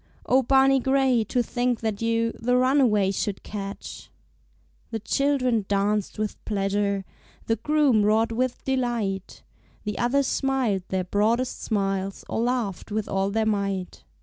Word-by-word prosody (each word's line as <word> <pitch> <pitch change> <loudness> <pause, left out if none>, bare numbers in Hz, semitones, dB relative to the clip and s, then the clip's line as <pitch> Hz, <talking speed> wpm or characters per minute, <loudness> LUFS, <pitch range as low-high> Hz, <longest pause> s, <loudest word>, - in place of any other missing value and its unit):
Oh, 260 +1 +4
Barney 270 +1 +4
Gray, 265 -2 +2
to 245 +3 0
think 245 -1 -1
that 220 -2 -2
you 230 0 +1
The 250 +2 +2
runaway 250 -7 +3
should 195 0 -3
catch! 200 -1 -7 0.8
The 225 - -3
children 255 -1 +1
danced 205 +1 0
with 215 -1 -4
pleasure, 200 -1 -1 0.4
The 225 - 0
groom 290 -3 +3
roared 220 +2 +2
with 250 +2 -1
delight, 235 -8 -2 0.4
The 210 -2 -4
others 270 +4 +2
smiled 260 -8 0
their 190 -1 -1
broadest 220 +7 0
smiles 195 -2 -2
Or - - -2
laughed 235 -5 -2
with 215 0 -2
all 195 0 0
their 220 +2 0
might. 200 -3 -2
225 Hz, 140 wpm, -25 LUFS, 200-250 Hz, 0.8 s, Oh